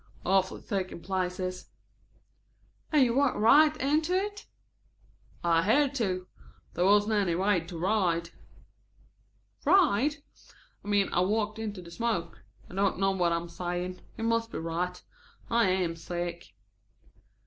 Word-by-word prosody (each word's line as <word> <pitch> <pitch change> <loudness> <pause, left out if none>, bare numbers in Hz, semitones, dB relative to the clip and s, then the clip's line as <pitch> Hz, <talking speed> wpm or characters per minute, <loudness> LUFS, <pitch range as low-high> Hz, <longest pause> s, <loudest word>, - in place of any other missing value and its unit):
"Awfully 190 0 +1
thick 190 -2 -3
in 170 - -9
places." 185 0 -3 1.2
"And 300 -3 +5
you 240 -2 +2
walked 275 0 +2
right 300 +8 +5
into 310 +6 +1
it?" 410 +2 -3 1.0
"I 165 -1 +3
had 270 - +3
to. 185 -8 -1 0.5
There 175 - +1
wasn't 205 +2 +4
any 195 -5 +1
way 190 +1 +2
to 165 +1 -8
ride." 170 -3 0 1.3
"Ride?" 300 - +4 0.7
"I - - -12
mean 205 -1 +2
I - - +2
walked 215 +3 0
into 205 -4 -5
the 170 - -12
smoke. 175 -6 -3 0.2
I - - -14
don't 195 0 +1
know 195 +1 +2
what 180 -3 +1
I - - +2
am 170 +1 -3
saying. 180 +1 -4 0.2
You 225 - -4
must 230 0 0
be - - -5
right. 175 +2 -3 0.5
I 235 -3 +4
am 180 -3 0
sick." 170 +1 -6
195 Hz, 140 wpm, -29 LUFS, 175-230 Hz, 1.3 s, And